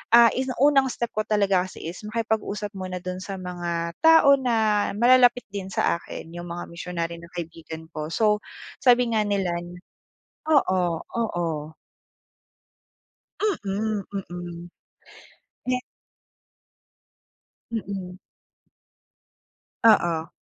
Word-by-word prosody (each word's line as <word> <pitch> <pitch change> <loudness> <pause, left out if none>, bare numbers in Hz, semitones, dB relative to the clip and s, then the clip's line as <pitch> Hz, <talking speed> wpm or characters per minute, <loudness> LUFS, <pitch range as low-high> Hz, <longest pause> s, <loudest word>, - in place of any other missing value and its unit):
ah, 235 -1 +8
ini 260 0 -2
unang 275 -2 +5
step 235 -2 -3
ko 215 0 -2
talaga 195 -3 +2
kasi - - -11
is - - -11
makipag-usap 215 -2 -2
muna 185 -1 -5
dun 185 0 -4
sa 195 +1 -6
mga 175 -2 -3
tao 310 -3 +7
na 220 -4 +2
malalapit 245 +1 +5
din 195 -2 -4
sa 175 -2 +1
akin, - - -10 0.2
yung 175 0 -6
mga 175 +1 -6
missionary 170 -1 -4
na 170 - -11
kaibigan 165 -1 -7
ko. 155 -2 -5
So, 210 -1 +3 0.4
sabi 245 -2 +5
nga 215 - +3
nila 200 -3 0
n 175 +1 -10 0.7
oo 190 -11 +4 0.3
oo. 165 -9 -2 1.9
Mm, 205 +1 -1
mm. 175 -2 -6 1.0
'Yan 255 0 +1 1.9
Mm. 195 -4 -5 1.7
Oo. 170 -7 +4
195 Hz, 110 wpm, -25 LUFS, 175-230 Hz, 1.9 s, ah